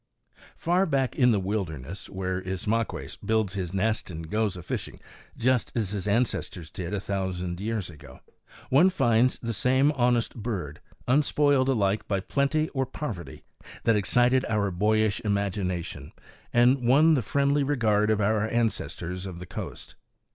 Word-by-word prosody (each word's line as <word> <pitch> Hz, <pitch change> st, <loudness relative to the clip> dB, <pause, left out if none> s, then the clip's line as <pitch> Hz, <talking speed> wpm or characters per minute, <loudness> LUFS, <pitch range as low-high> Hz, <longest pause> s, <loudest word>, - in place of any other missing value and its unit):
Far 180 Hz, +3 st, +1 dB
back 135 Hz, -4 st, 0 dB
in 125 Hz, -3 st, +4 dB
the 110 Hz, -4 st, +3 dB
wilderness, 95 Hz, -4 st, -4 dB
where 95 Hz, -1 st, -3 dB
Ismaques 105 Hz, +5 st, -2 dB
builds 110 Hz, -4 st, +1 dB
his 95 Hz, -4 st, -3 dB
nest 105 Hz, +3 st, -1 dB
and 80 Hz, -1 st, -7 dB
goes 105 Hz, -3 st, 0 dB
a 90 Hz, -, -8 dB
fishing -, -, -5 dB, 0.4 s
just 125 Hz, -1 st, +1 dB
as 110 Hz, -5 st, -1 dB
his 105 Hz, -1 st, -3 dB
ancestors 100 Hz, -6 st, -1 dB
did 90 Hz, -1 st, -5 dB
a 105 Hz, -, -1 dB
thousand 95 Hz, -3 st, -3 dB
years 110 Hz, -3 st, -2 dB
ago, 75 Hz, -5 st, -13 dB, 0.5 s
one 155 Hz, +8 st, +6 dB
finds 120 Hz, -8 st, +2 dB
the 115 Hz, -1 st, -3 dB
same 130 Hz, +6 st, +3 dB
honest 120 Hz, -4 st, +1 dB
bird, 100 Hz, -, -5 dB, 0.3 s
unspoiled 140 Hz, 0 st, +3 dB
alike 105 Hz, -5 st, +1 dB
by 100 Hz, -2 st, 0 dB
plenty 140 Hz, +9 st, 0 dB
or 135 Hz, -2 st, -2 dB
poverty, 105 Hz, -, -6 dB, 0.4 s
that 115 Hz, -1 st, +3 dB
excited 125 Hz, +5 st, +3 dB
our 105 Hz, -3 st, +1 dB
boyish 105 Hz, +3 st, +1 dB
imagination 100 Hz, -4 st, -2 dB, 0.4 s
and 125 Hz, +2 st, +4 dB
won 140 Hz, +7 st, +5 dB
the 140 Hz, -, +2 dB
friendly 140 Hz, +5 st, +1 dB
regard 110 Hz, -7 st, +2 dB
of 110 Hz, -1 st, +2 dB
our 105 Hz, +1 st, +1 dB
ancestors 100 Hz, -5 st, -2 dB
of 90 Hz, -2 st, -7 dB
the 90 Hz, -, -8 dB
coast. -, -, -7 dB
110 Hz, 150 wpm, -27 LUFS, 95-125 Hz, 0.5 s, one